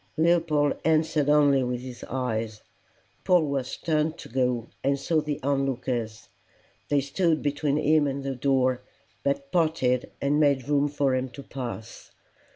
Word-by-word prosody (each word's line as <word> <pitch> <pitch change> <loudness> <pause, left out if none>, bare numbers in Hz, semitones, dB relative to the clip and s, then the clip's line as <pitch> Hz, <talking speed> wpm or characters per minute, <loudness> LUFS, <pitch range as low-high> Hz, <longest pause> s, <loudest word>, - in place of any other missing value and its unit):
Leopold 160 -3 +3
answered 155 -2 +2
only 145 -2 +5
with 125 -1 -2
his 125 -1 -9
eyes. 115 -4 -3 0.6
Polwarth 145 -8 +1
turned 155 0 0
to - - -10
go, 125 -2 0 0.2
and 140 +1 +2
saw 155 +3 +1
the 150 -1 -3
on 140 0 +1
lookers. 120 -4 -3 0.6
They 145 -1 +3
stood 160 +4 0
between 145 0 0
him 155 0 +3
and 140 0 -3
the 135 0 -2
door, 130 -1 +1 0.4
but 140 0 -1
parted 155 -7 +1
and 145 +2 +1
made 140 -4 +2
room 145 0 +2
for 140 -2 0
him 130 0 -1
to 140 +3 -10
pass. 120 -5 -7
140 Hz, 150 wpm, -26 LUFS, 130-150 Hz, 0.6 s, only